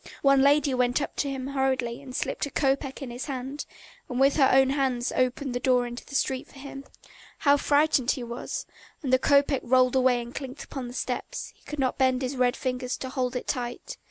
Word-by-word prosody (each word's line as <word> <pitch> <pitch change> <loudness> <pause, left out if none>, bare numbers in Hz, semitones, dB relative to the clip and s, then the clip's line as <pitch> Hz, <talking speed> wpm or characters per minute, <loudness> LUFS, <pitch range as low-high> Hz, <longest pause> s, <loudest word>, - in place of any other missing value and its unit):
One 275 -1 +5
lady 285 0 +4
went 250 0 +2
up 290 - -4
to 280 - 0
him 265 -1 -4
hurriedly 265 -3 -1
and 260 -2 -9
slipped - - -2
a - - -7
kopeck 275 0 -1
into 245 -3 -6
his 245 - -5
hand, 270 +1 -5 0.4
and 250 -1 -2
with 275 +1 +4
her 270 -3 +5
own 265 0 +5
hands 260 -3 0
opened 255 +1 0
the 245 - -1
door 250 -1 +3
into 240 0 -7
the 275 - -10
street 265 -1 0
for - - -17
him! 275 0 -9 0.5
How 285 -1 +4
frightened 285 -3 +2
he 255 - 0
was. 235 +1 -5 0.4
And 260 -2 -1
the 260 - +6
kopeck 280 0 +3
rolled 255 +1 +3
away 255 -1 +4
and 240 +1 -7
clinked 270 0 -6
upon 265 -3 -6
the 245 - -9
steps; - - -4
he - - -30
could 300 - -6
not 265 -1 0
bend 260 0 +2
his 260 +2 -2
red 250 0 +2
fingers 250 -1 -2
to 260 - -5
hold 255 -1 -2
it 250 - -3
tight. 245 - -4
260 Hz, 220 wpm, -27 LUFS, 250-275 Hz, 0.5 s, the